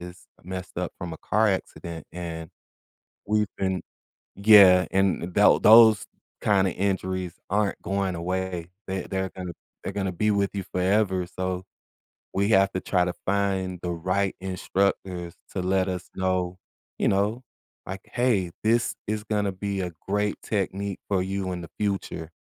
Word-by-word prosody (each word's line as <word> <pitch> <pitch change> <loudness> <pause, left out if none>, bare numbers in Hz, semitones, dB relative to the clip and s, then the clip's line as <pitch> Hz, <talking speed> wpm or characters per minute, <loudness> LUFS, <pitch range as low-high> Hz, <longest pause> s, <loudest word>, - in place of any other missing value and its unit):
is 90 0 -10 0.2
messed 90 -1 -7
up 90 -1 -2
from 85 -2 -5
a - - -8
car 110 +1 +2
accident, 85 -4 -4
and 80 -2 -6 0.8
we've 105 0 +2
been 95 -2 -1 0.6
Yeah, 100 -4 +8
and 95 -2 +2
tha 105 - +4
th - - +2
those 110 -1 +8 0.3
kind 95 -2 +3
of - - -2
injuries 95 -2 -1 0.2
aren't 105 0 +1
going 95 -2 -1
away, 90 0 -3 0.2
they 95 0 -2
they're 95 -1 -2
gonna 90 -2 -5 0.3
they're - - -4
gonna 95 -2 -2
be 105 +5 +1
with 100 -1 +1
you 100 - -2
forever, 95 -1 +2
so 95 0 -3 0.7
we 100 +2 +1
have 95 -2 +5
to 95 - -2
try 90 -2 +2
to 90 - -2
find 95 -2 0
the 90 - -2
right 95 +3 0
instructors 95 -2 -1 0.2
to 95 - -1
let 95 +1 +1
us 90 -1 -5
know, 90 -1 0 0.4
you - - +2
know, 105 +6 +1 0.4
like, 95 +1 -6
"Hey, 110 -8 +1
this 115 +2 +2
is 105 0 -2
gonna 105 -2 0
be 100 +1 -3
a 90 -1 -3 0.2
great 105 +1 0
technique 100 -1 -2
for 95 -2 +2
you 95 -1 -2
in 90 - -5
the 85 - -9
future," 95 -5 -2
95 Hz, 160 wpm, -26 LUFS, 90-100 Hz, 0.8 s, Yeah